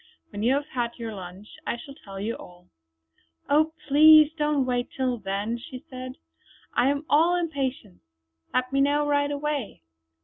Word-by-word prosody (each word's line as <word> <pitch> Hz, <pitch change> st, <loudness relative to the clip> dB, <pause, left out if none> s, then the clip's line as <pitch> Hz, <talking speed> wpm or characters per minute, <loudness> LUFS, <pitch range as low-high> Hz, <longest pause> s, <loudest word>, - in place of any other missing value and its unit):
When 205 Hz, -1 st, -5 dB
you 245 Hz, +5 st, +3 dB
have 285 Hz, +1 st, -1 dB
had 240 Hz, -3 st, -3 dB
your 230 Hz, -2 st, -5 dB
lunch 190 Hz, +1 st, -9 dB, 0.2 s
I -, -, -1 dB
shall 275 Hz, +3 st, -10 dB
tell 195 Hz, -9 st, -10 dB
you 215 Hz, +4 st, -2 dB
all." 180 Hz, 0 st, -14 dB, 0.8 s
"Oh 310 Hz, +2 st, +3 dB, 0.2 s
please 305 Hz, +1 st, +8 dB
don't 295 Hz, -3 st, +1 dB
wait 245 Hz, -1 st, -1 dB
till 255 Hz, -2 st, 0 dB
then," 205 Hz, +4 st, -3 dB
she 255 Hz, +1 st, -10 dB
said, 255 Hz, 0 st, -6 dB, 0.6 s
"I 250 Hz, +2 st, +3 dB
am 285 Hz, +2 st, -1 dB
all 330 Hz, +4 st, +4 dB
impatience. 275 Hz, -, -3 dB, 0.5 s
Let 255 Hz, +1 st, -1 dB
me 275 Hz, -, +3 dB
know 290 Hz, +1 st, +2 dB
right 285 Hz, 0 st, +1 dB
away." 285 Hz, -, -3 dB
260 Hz, 165 wpm, -26 LUFS, 230-290 Hz, 0.8 s, please